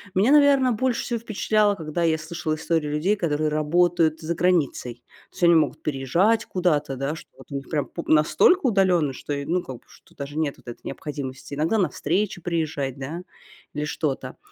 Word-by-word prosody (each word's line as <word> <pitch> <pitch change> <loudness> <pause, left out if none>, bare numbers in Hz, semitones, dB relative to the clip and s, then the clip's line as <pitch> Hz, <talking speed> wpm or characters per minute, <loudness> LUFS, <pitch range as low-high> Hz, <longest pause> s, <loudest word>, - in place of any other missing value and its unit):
Меня, 210 +9 +4
наверно, 280 -3 +5
больше 245 +2 0
всего 235 -2 -2
впечатляло, 215 -2 +1
когда 160 +1 -3
я 160 -1 +2
слышала 160 0 -3
истории 160 -1 -1
людей, 160 +8 +1
которые 155 -4 0
работают 160 +1 +2
за 165 +2 -2
границей. 140 -9 0 0.3
То - - -36
есть - - -6
они 170 -1 +7
могут 155 - +1
переезжать 160 - +1
куда-то, 155 -7 0
да, 140 +4 -2
что - - -12
вот - - -16
у - - -4
них 135 - -6
прям 145 -3 0
пу 170 - -7
настолько 165 - +4
удалённо, 185 - +3
что 145 - -8
и, 140 0 -3
ну, 180 +2 0
как 130 - -7
бы, - - -23
что - - -21
даже 145 +1 -7
нет 150 -3 0
вот - - -22
этой 120 - -8
необходимости 140 -1 -6
иногда 160 +9 +1
на 190 - +2
встречи 185 +3 -1
приезжать, 155 -6 -2
да, 150 +6 -5 0.5
или 150 0 -2
что-то. 150 -2 -3
160 Hz, 195 wpm, -24 LUFS, 145-185 Hz, 0.5 s, они